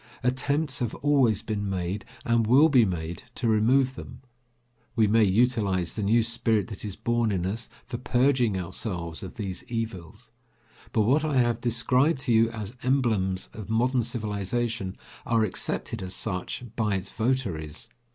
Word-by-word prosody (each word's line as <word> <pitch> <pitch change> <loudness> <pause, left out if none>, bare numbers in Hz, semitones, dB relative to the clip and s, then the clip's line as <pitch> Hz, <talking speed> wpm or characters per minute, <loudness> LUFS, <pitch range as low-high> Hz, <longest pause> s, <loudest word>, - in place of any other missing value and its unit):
Attempts 140 +3 0
have 120 -3 -2
always 135 -8 +2
been 105 -2 -2
made, 95 +1 -3 0.2
and 115 -1 +2
will 140 +7 +6
be 125 -6 +5
made, 85 -3 -4
to 120 - -1
remove 125 +5 +3
them. - - -10 0.7
We 110 -3 +4
may 110 +2 +4
utilise 100 -4 +2
the 110 - -4
new 110 +3 +3
spirit 115 -1 0
that 105 - -6
is 100 -3 -4
born 120 -2 0
in 90 -3 -1
us 110 +5 -3 0.2
for 120 - -5
purging 125 -5 +2
ourselves 90 -2 -4
of 95 - -8
these 95 -4 -4
evils. 115 -8 -5 0.6
But 110 - +2
what 135 +8 +3
I 150 -3 0
have 120 -2 +2
described 125 +5 +2
to 120 - +1
you 115 0 +5
as 110 0 -6
emblems 110 -8 0
of 110 -1 -8
modern 125 +3 +2
civilization 110 -2 -2 0.3
are 115 -1 +2
accepted 105 - -3
as 95 0 -4
such 90 +3 -3
by 105 -3 +1
its 95 - -4
votaries. 110 - -2
115 Hz, 160 wpm, -27 LUFS, 95-125 Hz, 0.7 s, will